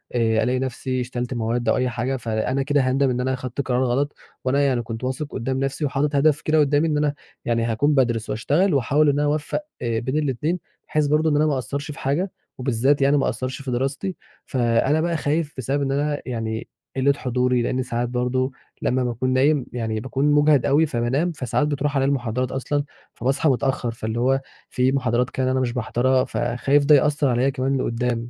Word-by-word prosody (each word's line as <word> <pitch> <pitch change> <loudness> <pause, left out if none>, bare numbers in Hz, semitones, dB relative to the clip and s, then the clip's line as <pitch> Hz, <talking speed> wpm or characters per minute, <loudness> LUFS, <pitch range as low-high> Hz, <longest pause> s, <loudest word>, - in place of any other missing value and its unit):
آآ 110 -2 +2
ألاقي 125 +1 +1
نفسي 130 0 -2
شيلت 125 0 -4
مواد 120 0 -1
أو - - +3
أي 125 0 +1
حاجة، 125 +3 -2
فأنا 120 +3 -1
كده 145 0 +2
هاندم 130 +1 +2
إن 125 0 -1
أنا 130 +1 0
أخدت 130 +1 -3
قرار 130 -1 0
غلط، 135 +4 0 0.3
وأنا 135 +2 +2
يعني 135 -4 +2
كنت 115 0 -7
واثق 130 +4 -2
قُدّام 130 +3 -2
نفسي 135 +3 -1
وحاطط 140 +1 0
هدف 150 +1 +3
كده 155 0 +2
قدّامي 145 +2 +3
إن 150 -2 0
أنا 150 -1 +1 0.3
يعني 115 -1 +1
هاكون 120 +6 +1
بادرس 120 -5 +1
واشتغل 155 - +1
واحاول 145 +3 +3
إن 145 0 +1
أنا 145 - +2
أوفّق 150 - -1 0.2
آآ 115 -2 0
بين 130 +5 -2
الاتنين، 150 +4 -1 0.3
بحيث 150 -1 +1
برضه 155 +2 +2
إن 150 - +1
أنا 150 +1 +3
ما 155 - +1
اقصّرش 140 +3 -3
في 145 - -10
حاجة 165 +8 -1 0.3
وبالذات 130 +2 +1
يعني 140 +2 +4
ما 135 - +1
اقصّرش 130 +1 -3
في 135 -2 -4
دراستي، 135 +9 -2 0.3
فأنا 130 +4 +2
بقى 170 0 0
خايف 150 +1 -1
بسبب 135 +3 -1
إن 135 -1 0
أنا 145 +1 0
يعني 115 -3 -3 0.3
قِلّة 135 +1 +3
حضوري، 125 -2 0
لأن 130 +2 -1
ساعات 120 -1 -2
برضه 125 +2 0 0.3
لمّا 130 0 +1
باكون 125 +1 -1
نايم 135 +1 +3
يعني 110 -3 -2
باكون 135 +5 0
مجهد 145 -2 +4
أوي، 145 +3 +4
فبانام، 135 +6 0
فساعات 145 0 -1
بتروح 145 0 -1
عليَّ 135 -1 +2
المحاضرات 125 -2 -1
أصلًا، 145 +2 -1 0.3
فباصحى 135 +5 +1
متأخّر 130 -2 0
فاللي 110 0 -4
هو 135 +2 +2 0.3
في 130 +1 +1
محاضرات 125 -2 +1
كده 130 0 -1
أنا 130 - +1
مش 125 -2 -1
باحضرها، 130 +2 +1
فخايف 135 +4 +1
ده 150 +1 +7
يأثّر 145 +1 +2
عليَّ 125 +3 +2
كمان 135 0 0
لقدام، 120 -1 -1
130 Hz, 200 wpm, -23 LUFS, 125-145 Hz, 0.3 s, ده